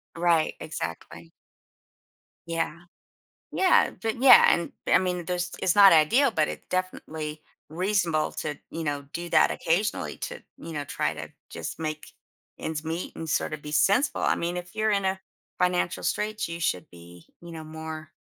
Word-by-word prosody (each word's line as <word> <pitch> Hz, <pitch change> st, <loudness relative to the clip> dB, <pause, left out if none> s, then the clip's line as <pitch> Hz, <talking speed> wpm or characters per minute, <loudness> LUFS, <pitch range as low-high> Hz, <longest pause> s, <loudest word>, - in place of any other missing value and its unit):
Right, 170 Hz, -2 st, +2 dB
exactly. 85 Hz, -, -6 dB, 1.2 s
Yeah, 165 Hz, -1 st, -2 dB, 0.7 s
yeah, 375 Hz, -1 st, +4 dB
but 225 Hz, +2 st, -2 dB
yeah, 270 Hz, -, +9 dB
and, 170 Hz, -1 st, -2 dB, 0.2 s
I -, -, +5 dB
mean, 180 Hz, -2 st, -2 dB
there's 180 Hz, 0 st, -2 dB
it's 180 Hz, -, +2 dB
not 200 Hz, -1 st, +9 dB
ideal, 230 Hz, -, +5 dB
but 155 Hz, -5 st, +1 dB
it -, -, -6 dB
definitely 155 Hz, -4 st, -4 dB, 0.3 s
reasonable 175 Hz, -2 st, 0 dB
to, 150 Hz, -, -4 dB, 0.2 s
you 165 Hz, 0 st, -4 dB
know, 145 Hz, -1 st, -2 dB
do 170 Hz, 0 st, -5 dB
that -, -, +5 dB
occasionally 185 Hz, +6 st, -1 dB
to, -, -, -6 dB, 0.2 s
you 165 Hz, -, -9 dB
know, 145 Hz, -2 st, -4 dB
try -, -, -1 dB
to -, -, -8 dB, 0.2 s
just -, -, -6 dB
make 155 Hz, -1 st, -4 dB, 0.5 s
ends 160 Hz, 0 st, -4 dB
meet 165 Hz, +2 st, -4 dB
and 160 Hz, -1 st, -6 dB
sorta 155 Hz, +1 st, 0 dB
be 150 Hz, +1 st, -9 dB
sensible. 205 Hz, -, +2 dB
I -, -, +2 dB
mean 175 Hz, +1 st, -2 dB
if 180 Hz, 0 st, -8 dB
you're 215 Hz, 0 st, +1 dB
in 200 Hz, -1 st, +1 dB
a 190 Hz, 0 st, +1 dB, 0.4 s
financial 180 Hz, -1 st, +1 dB
straits 215 Hz, -1 st, -1 dB
you 170 Hz, 0 st, -5 dB
should 90 Hz, -, -1 dB
be, 85 Hz, 0 st, -14 dB, 0.2 s
you 170 Hz, 0 st, -10 dB
know, 160 Hz, -1 st, -7 dB
more 155 Hz, 0 st, -7 dB
170 Hz, 165 wpm, -26 LUFS, 155-185 Hz, 1.2 s, yeah